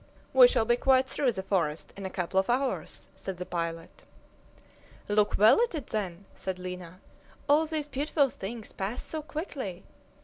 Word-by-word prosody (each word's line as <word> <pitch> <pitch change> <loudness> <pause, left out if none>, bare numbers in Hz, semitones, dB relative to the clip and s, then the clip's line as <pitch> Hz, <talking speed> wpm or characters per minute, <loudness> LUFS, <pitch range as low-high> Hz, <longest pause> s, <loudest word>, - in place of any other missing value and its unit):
"We - - +9
shall 235 - +2
be 240 +1 +3
quite 260 0 +4
through 265 -2 +1
the 190 - -4
forest 170 -6 -1
in 195 -1 -5
a - - -6
couple 185 +1 0
of 190 - -1
hours," 260 +2 -1
said 190 -2 -6
the 180 - -5
pilot. 165 -1 -4 1.1
"Look 210 0 +2
well 215 - +7
at 475 -7 +1
it, 290 -6 -5
then!" 195 -3 -3
said 190 -1 -4
Lina. 180 -1 -7 0.5
"All 300 +2 +4
these 305 -2 -3
beautiful 285 -1 +1
things 220 +2 -7
pass 200 +5 -3
so 315 - -4
quickly! 290 - -5
210 Hz, 170 wpm, -29 LUFS, 185-275 Hz, 1.1 s, We